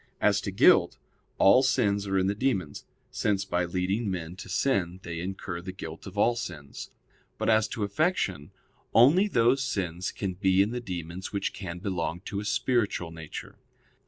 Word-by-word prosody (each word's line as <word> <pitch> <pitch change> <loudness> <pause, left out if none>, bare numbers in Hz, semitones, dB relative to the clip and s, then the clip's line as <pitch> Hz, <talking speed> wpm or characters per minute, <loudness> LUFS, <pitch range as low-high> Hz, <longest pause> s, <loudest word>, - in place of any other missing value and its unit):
As - - +3
to - - -4
guilt, - - +5 0.4
all 100 +6 +6
sins 100 -7 +1
are 95 0 0
in 95 - +2
the 100 - +1
demons; 100 - -2 0.3
since 100 -2 0
by 90 -2 0
leading 95 +5 -1
men 90 -2 -4
to - - -9
sin 95 -9 0
they 85 -1 -5
incur 90 -1 -5
the 95 +1 -6
guilt 80 -2 -8
of 95 +1 -10
all 120 +3 +3
sins. 75 -11 -7 0.5
But - - +1
as 110 0 +3
to 110 - -4
affection 100 - 0 0.5
only 150 - +6
those 125 - +3
sins 95 -8 -2
can 95 -2 -3
be 95 +1 +3
in 105 - -3
the 125 0 -3
demons 90 -2 -6
which 100 - -2
can 90 -3 -6
belong 90 -2 -3
to 100 0 -4
a 105 - -5
spiritual 105 -5 0
nature. 80 -2 -9
95 Hz, 175 wpm, -28 LUFS, 90-110 Hz, 0.5 s, all